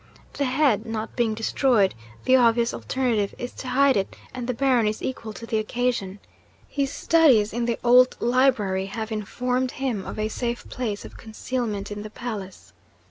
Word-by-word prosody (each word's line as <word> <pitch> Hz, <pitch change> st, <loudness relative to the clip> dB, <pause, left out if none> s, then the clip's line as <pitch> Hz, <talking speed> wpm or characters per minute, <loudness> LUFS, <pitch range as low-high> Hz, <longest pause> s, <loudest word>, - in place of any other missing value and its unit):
The 280 Hz, -, -1 dB
head 255 Hz, -5 st, +2 dB
not 225 Hz, 0 st, -4 dB
being 230 Hz, -3 st, +1 dB
destroyed, 225 Hz, -2 st, +2 dB, 0.3 s
the 260 Hz, -, +5 dB
obvious 235 Hz, -1 st, +3 dB
alternative 235 Hz, -6 st, -1 dB
is 245 Hz, -, -5 dB
to 260 Hz, -, -8 dB
hide 270 Hz, +1 st, +4 dB
it 195 Hz, -1 st, -1 dB, 0.2 s
and 250 Hz, -2 st, -5 dB
the 250 Hz, -, 0 dB
Baron 255 Hz, -4 st, +3 dB
is 215 Hz, 0 st, -3 dB
equal 230 Hz, -4 st, -4 dB
to 230 Hz, -, -9 dB
the 220 Hz, -1 st, 0 dB
occasion. 215 Hz, -3 st, -1 dB, 0.5 s
His 280 Hz, -1 st, -1 dB
studies 280 Hz, -10 st, +4 dB
in 235 Hz, +1 st, -1 dB
the 235 Hz, -1 st, 0 dB
old 250 Hz, +1 st, +5 dB
library 230 Hz, -7 st, +2 dB
have 220 Hz, +2 st, -5 dB
informed 250 Hz, +4 st, -1 dB
him 250 Hz, -7 st, -2 dB
of -, -, -6 dB
a 215 Hz, 0 st, 0 dB
safe 235 Hz, +2 st, -3 dB
place 220 Hz, -5 st, -4 dB
of -, -, -11 dB
concealment 220 Hz, -2 st, -4 dB
in 205 Hz, 0 st, -5 dB
the 215 Hz, -, -7 dB
palace. 205 Hz, -, -7 dB
235 Hz, 175 wpm, -24 LUFS, 215-255 Hz, 0.5 s, the